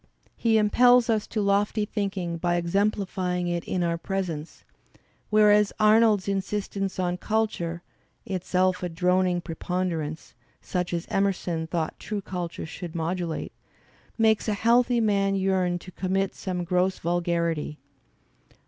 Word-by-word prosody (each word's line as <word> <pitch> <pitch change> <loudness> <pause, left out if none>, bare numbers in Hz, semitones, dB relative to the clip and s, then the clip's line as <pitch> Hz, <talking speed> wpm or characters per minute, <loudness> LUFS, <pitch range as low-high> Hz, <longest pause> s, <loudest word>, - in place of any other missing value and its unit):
He 225 -1 +2
impels 245 +3 +5
us 215 -2 0
to 215 - -2
lofty 205 +2 +1
thinking 195 -5 -3
by 175 +1 0
exemplify 185 0 0
ing 175 0 -1
it 175 -1 -1
in 180 -1 -1
our 170 -1 0
presence; 170 -5 -4 0.7
whereas 210 -1 +5
Arnold's 215 -2 +4
insistence 195 0 -2
on 180 -1 -1
culture 175 -5 -2 0.4
(itself 185 -1 0
a 180 - -2
"'droning 180 +1 +1
preponderance" 165 -2 -3 0.3
such 180 -1 -3
as 170 -1 -2
Emerson 180 -4 0
thought 160 -1 -3
true 210 -1 -4
culture 180 -4 -5
should 165 +1 -8
modulate) 170 0 -2 0.7
makes 220 -1 +3
a 210 - +1
healthy 235 +3 +3
man 200 -3 +2
yearn 190 -2 +1
to 185 +1 -11
commit 190 +2 -1
some 180 -2 -4
gross 180 +2 +1
vulgarity. 170 -3 -1
185 Hz, 130 wpm, -26 LUFS, 175-205 Hz, 0.7 s, impels